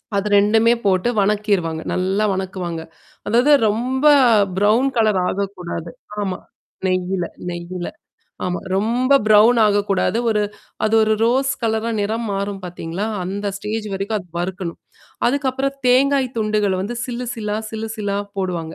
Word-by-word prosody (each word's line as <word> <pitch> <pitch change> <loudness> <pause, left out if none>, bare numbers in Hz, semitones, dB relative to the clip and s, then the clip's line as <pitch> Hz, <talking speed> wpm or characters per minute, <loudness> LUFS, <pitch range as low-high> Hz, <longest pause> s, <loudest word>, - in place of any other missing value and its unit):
அது 200 +1 0
2மே 220 +3 +4
போட்டு 190 +4 +2
வணக்கிருவாங்க. 200 -6 0
நல்லா 190 +3 0
வணக்குவாங்க. 185 -3 -4 0.5
அதாவது 240 +7 +3 0.2
ரொம்ப 250 +6 -1 0.5
ப்ரவுன் 215 +7 +3
கலர் 215 -4 +3
ஆகக்கூடாது. 180 -4 -4 0.3
ஆமா. 190 -2 -2 0.5
நெய்யில, 185 -1 0 0.2
நெய்யில. 175 +1 -5 0.6
ஆமா. 180 -1 -2 0.2
ரொம்ப 240 +6 +1
பிரவுன் 215 +3 +6
ஆகக்கூடாது. 205 +1 +1
ஒரு 210 -1 +1 0.4
அது 215 +1 +2
ஒரு 220 0 +2
ரோஸ் 265 +3 +2
கலரா 220 0 0
நிறம் 220 +3 -1
மாறும் 200 0 -3
பார்த்தீங்களா, 175 +2 -4 0.2
அந்த 200 +3 -4
ஸ்டேஜ் 215 +1 -4
வரைக்கும் 200 +3 -2
அது 180 -2 -12
வறுக்கணும். 180 -1 -4 0.5
அதுக்கப்புறம் 275 +1 -1
தேங்காய் 265 +1 +4
துண்டுகள 215 -2 +1
வந்து 235 +5 -4
சில்லு 250 0 -4
சில்லா, 210 -2 -3
சில்லு 220 0 -4
சில்லா 205 -2 -2 0.2
போடுவாங்க 170 -4 -3
205 Hz, 130 wpm, -20 LUFS, 185-225 Hz, 0.6 s, பிரவுன்